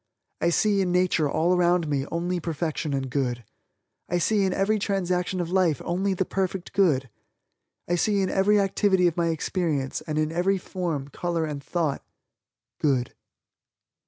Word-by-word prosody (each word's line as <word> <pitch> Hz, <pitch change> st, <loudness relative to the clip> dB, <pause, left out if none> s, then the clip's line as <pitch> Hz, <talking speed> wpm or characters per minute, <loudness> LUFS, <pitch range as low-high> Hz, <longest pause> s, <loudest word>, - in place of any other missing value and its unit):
I 170 Hz, -, +3 dB
see 200 Hz, +3 st, +2 dB
in 180 Hz, -2 st, 0 dB
nature 180 Hz, -4 st, +2 dB
all 165 Hz, +5 st, +2 dB
around 175 Hz, -1 st, +2 dB
me 140 Hz, -1 st, -1 dB
only 175 Hz, +2 st, -1 dB
perfection 160 Hz, -1 st, -3 dB
and 135 Hz, -1 st, -2 dB
good. 125 Hz, -2 st, -2 dB, 0.7 s
I 175 Hz, -, +1 dB
see 200 Hz, +3 st, +2 dB
in 190 Hz, -, +1 dB
every 200 Hz, +3 st, +1 dB
transaction 185 Hz, -2 st, -1 dB
of 175 Hz, -1 st, -3 dB
life 180 Hz, -7 st, +2 dB
only 190 Hz, +3 st, 0 dB
the 190 Hz, -, 0 dB
perfect 190 Hz, -1 st, -3 dB
good. 150 Hz, -10 st, +3 dB, 0.8 s
I 175 Hz, -, 0 dB
see 200 Hz, +3 st, +2 dB
in 190 Hz, -, -1 dB
every 205 Hz, +2 st, +3 dB
activity 195 Hz, -1 st, +2 dB
of 170 Hz, -2 st, +2 dB
my 170 Hz, -1 st, +1 dB
experience, 160 Hz, -4 st, -1 dB
and 155 Hz, -1 st, -2 dB
in 155 Hz, 0 st, +1 dB
every 180 Hz, +4 st, +1 dB
form, 170 Hz, -7 st, -4 dB
color 170 Hz, +2 st, -2 dB
and 145 Hz, -2 st, -5 dB
thought, 160 Hz, -2 st, -1 dB, 0.8 s
good. 130 Hz, -5 st, +1 dB
175 Hz, 160 wpm, -25 LUFS, 155-190 Hz, 0.8 s, I